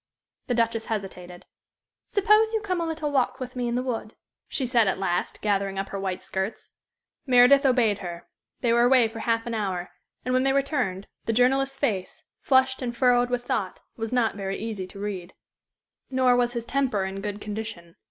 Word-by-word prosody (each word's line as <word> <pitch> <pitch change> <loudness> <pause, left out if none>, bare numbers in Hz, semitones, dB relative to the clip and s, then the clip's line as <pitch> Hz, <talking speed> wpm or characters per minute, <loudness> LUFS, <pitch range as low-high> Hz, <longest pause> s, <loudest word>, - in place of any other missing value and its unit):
The 245 - 0
Duchess 230 -1 0
hesitated. 180 -5 -5 0.6
"Suppose 425 +2 +3
you 440 - 0
come 365 -4 -1
a 335 - -1
little 315 -2 -2
walk 265 -1 +1
with 255 -1 -6
me 245 -1 -1
in 235 - -1
the 250 - 0
wood," 225 -4 -4 0.3
she 265 - -2
said, 235 -3 +3
at 190 - +1
last, 180 -2 -2
gathering 200 -2 0
up 195 0 -3
her 195 - -4
white 190 -1 -3
skirts. 190 +3 -4 0.5
Meredith 260 +2 +6
obeyed 230 -6 +3
her. 175 -2 -7 0.3
They 235 -2 +2
were 235 - +4
away 245 -1 +5
for 225 +1 -8
half 230 0 0
an 235 - -4
hour, 190 -5 -2 0.3
and 255 - 0
when 255 - +3
they 270 0 +2
returned 260 -9 0 0.2
the 225 - 0
journalist's 270 +3 +2
face, 205 -10 -2 0.2
flushed 260 0 +3
and 240 -2 -4
furrowed 245 0 +4
with 245 0 -2
thought, 195 -4 -2
was 225 -1 -4
not 245 -3 +2
very 195 -1 -4
easy 210 -4 -4
to 185 - -13
read. 195 -3 -5 0.7
Nor 255 -1 +3
was 245 0 +1
his 235 -1 -3
temper 255 -8 0
in 190 +1 -5
good 205 0 -4
condition. 210 -5 -6
235 Hz, 190 wpm, -26 LUFS, 200-255 Hz, 0.7 s, Meredith